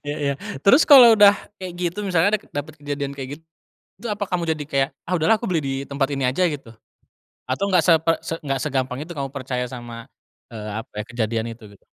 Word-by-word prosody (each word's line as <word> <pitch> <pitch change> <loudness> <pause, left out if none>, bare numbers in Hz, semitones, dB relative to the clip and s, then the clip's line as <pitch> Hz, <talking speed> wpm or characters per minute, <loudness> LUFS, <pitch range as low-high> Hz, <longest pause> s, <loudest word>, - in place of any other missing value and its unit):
Iya 145 - -3
iya. 140 -1 0 0.3
Terus 265 +10 +7
kalo 245 -6 +9
udah 205 -1 +8 0.3
kayak 185 -2 -6
gitu, 175 +3 -2
misalnya 190 +3 +3
dake 210 - -19
dapet 145 +1 -5
kejadian 145 -1 -4
kayak 130 -2 -6
git - - -30 0.5
itu 230 +5 -7
apa 205 -1 -4
kamu 175 -2 -1
jadi 150 -2 -5
kayak, 135 -2 +1 0.2
ah 185 - -3
udahlah 215 +7 +2
aku 235 - -4
beli 170 -4 +1
di 135 - -2
tempat 140 0 -1
ini 135 -2 0
aja, 180 +8 +1
gitu? 140 -5 -8 0.8
Atau 170 +10 0
nggak 180 -4 +3
seper 165 0 +4
se 165 - -4
nggak 135 -3 -3
segampang 130 -2 -2
itu 160 - -10
kamu 140 -5 -3
percaya 125 -2 -3
sama, 120 -2 -9 0.5
eee, 105 -1 -6
apa 115 - -9
ya, - - -11
kejadian 115 -1 -2
itu? 115 0 -11
Gitu. - - -21
145 Hz, 215 wpm, -22 LUFS, 130-180 Hz, 0.8 s, kalo